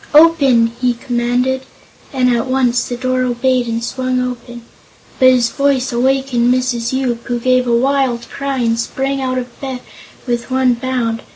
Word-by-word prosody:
"Open!" 280 -8 +5
he 250 -1 +1
commanded, 245 +2 -1 0.5
and 255 -2 +1
at 235 +2 -1
once 255 -2 +1
the 245 - -4
door 255 0 -1
obeyed 250 0 0
and 230 0 -2
swung 255 +1 -2
open, 240 -1 -5 0.6
But 255 - +7
his 245 -2 +3
voice 275 -2 0
wakened 255 -1 +1
Mrs. 250 -2 0
Yoop, 250 -3 -2
who 240 -1 -2
gave 255 +1 +2
a 235 -1 +3
wild 260 -2 0
cry 275 -1 -4
and 230 -2 0
sprang 270 +3 -2
out 255 -1 -1
of 245 -1 -7
bed 260 -2 -5 0.4
with 240 -1 -2
one 260 -1 +2
bound. 240 -2 -2
250 Hz, 165 wpm, -16 LUFS, 240-260 Hz, 0.6 s, But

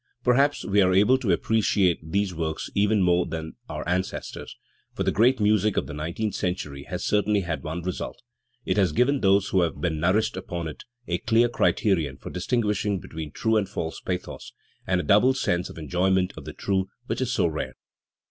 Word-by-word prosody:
Per 125 - +4
haps 140 +3 +2
we 100 +1 +3
are 90 -1 +3
able 105 +7 +5
to 120 -6 -3
appreciate 100 -5 +2
these 95 +4 -1
works 80 -1 -3
even 105 0 +3
more 90 0 +3
than 80 -1 -5 0.2
our - - -5
ancestors, 90 +2 -3 0.4
for - - -1
the - - +1
great 120 +5 +3
music 105 0 +2
of - - +1
the - - -7
nineteenth 85 +8 -3
cent 90 0 -2
ury 70 -2 -9
has - - -5
certainly 105 0 +2
had 85 -3 -3
one 80 +2 -5
result 90 0 -4 0.5
it - - 0
has 95 -6 +3
given 135 - +2
those 100 0 +3
who 95 - +3
have 85 -2 -1
been 80 -3 -1
nourished 95 +7 +2
upon 85 -1 -4
it 80 - -9 0.2
a 85 0 -1
clear 115 +4 +3
criterion 85 - +1
for - - -9
distinguish 105 +2 0
ing 100 -2 0
between 80 -2 -7
true 110 +5 +1
and 100 -3 0
false 80 -5 -4
pathos, 90 -1 -5 0.3
and 95 0 +2
a - - -1
doubled 125 +6 +4
sense 90 -8 0
of - - -11
enjoyment 90 +3 +1
of - - -10
the - - -7
true, 95 -1 -1 0.2
which - - -3
is 125 -1 0
so 125 - +2
rare. 80 -2 -3
95 Hz, 205 wpm, -25 LUFS, 85-105 Hz, 0.5 s, able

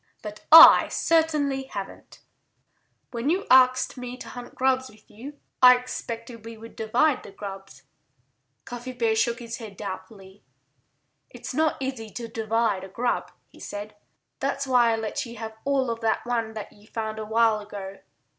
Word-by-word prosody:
"But 210 -1 -9
I 325 +1 +10
certainly 300 -5 +1
haven't. 200 -7 -9 0.9
When 240 +3 -2
you 370 +5 0
asked 255 0 +4
me 250 0 -7
to - - -10
hunt 245 -1 -10
grubs 260 0 +1
with 215 0 -21
you 265 +8 -10 0.2
I 250 -1 +9
expected 230 -2 -7
we 230 0 -9
would 225 +1 -13
divide 250 +6 +1
the - - -12
grubs." 195 -1 -10 0.8
Cuffy 245 +1 -7
Bear 230 -3 0
shook 235 +1 +1
his 235 -1 -7
head 215 -5 -10
doubtfully. 190 0 -9 0.9
"It's - - -8
not 315 0 +1
easy 260 -5 -5
to 235 -1 -6
divide 225 -3 -1
a - - -7
grub," 240 +5 -2 0.2
he - - -19
said. 205 +1 -8 0.4
"That's 275 0 -2
why 245 -3 +3
I - - +1
let 225 +4 -3
you 235 0 -10
have 220 0 -7
all 270 -3 +1
of 230 - -5
that 225 0 0
one 230 -2 -2
that 215 -2 -8
you 205 +1 -21
found 220 -1 -5
a 215 - -5
while 225 -1 +2
ago." 200 -2 -9
230 Hz, 165 wpm, -25 LUFS, 215-255 Hz, 0.9 s, I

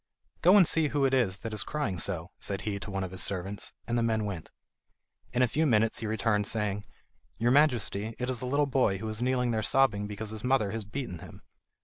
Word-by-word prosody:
"Go 185 +4 +7
and 185 -5 +6
see 160 -2 +3
who 140 -1 +1
it 135 - +1
is 115 -8 +2
that 115 - -3
is 105 - -1
crying 115 - -3
so," 85 -2 -2
said 100 -1 -2
he 100 -2 -3
to 100 - -7
one 95 -1 -2
of 95 - -5
his 95 -1 +1
servants, 95 +4 -1
and 120 - -2
the 120 - +2
man 110 -2 0
went. 95 -6 -5 0.8
In 125 +1 +2
a - - +4
few 155 +6 +1
minutes 110 -3 +2
he 115 - -3
returned 105 -1 0
saying: 105 -2 -1 0.5
"Your 120 +2 +2
Majesty, 115 -6 +2
it 125 - -3
is 130 -3 -2
a 125 - -3
little 145 +3 +2
boy 130 -8 +1
who 110 +3 -5
is 110 +1 -2
kneeling 125 -1 +1
there 110 -1 0
sobbing 105 -4 +2
because 105 +1 -6
his 110 0 -7
mother 125 -6 +2
has 110 -1 -4
beaten 105 -5 -5
him." - - -12
110 Hz, 235 wpm, -29 LUFS, 100-130 Hz, 0.8 s, Go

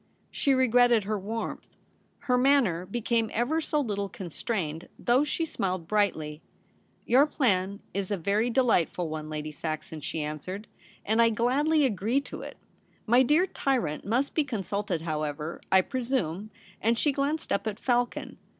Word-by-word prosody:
She 275 -2 +2
regretted 245 -3 +4
her 210 +1 -2
warmth. 220 +4 -5 0.5
Her 250 -3 +1
manner 250 -10 +3
became 230 +1 0
ever 265 +9 +1
so 300 -1 0
little 200 -7 -2
constrained, 170 -3 -4
though 250 +4 +3
she 310 +2 -1
smiled 185 - -3
brightly. 160 -8 0 0.3
* - - -38
Your 265 +5 +5
plan 200 -9 0
is 195 -1 -2
a 205 - 0
very 205 +7 +1
delightful 205 -9 +2
one, 155 0 -5
Lady 155 0 -4
Saxon,' 155 +1 -5
she 155 +1 -3
answered, 170 +8 -5 0.2
' - - -27
and 220 +2 +3
I 230 - +6
gladly 280 +7 +2
agree 225 +2 +1
to - - -8
it. - - -8 0.5
My 240 +3 +5
dear 300 +8 +4
tyrant 250 - -1
must 250 +7 0
be 310 - +2
consulted 200 - -3
how 155 -2 -2
ever, 150 +2 -4
I 190 - +7
presume,' 225 - -2 0.3
and 230 +2 +2
she 290 - +2
glanced 285 +3 -2
up 200 - -1
at 210 -1 -3
Falcon. 245 -1 -1
215 Hz, 160 wpm, -28 LUFS, 180-255 Hz, 0.5 s, I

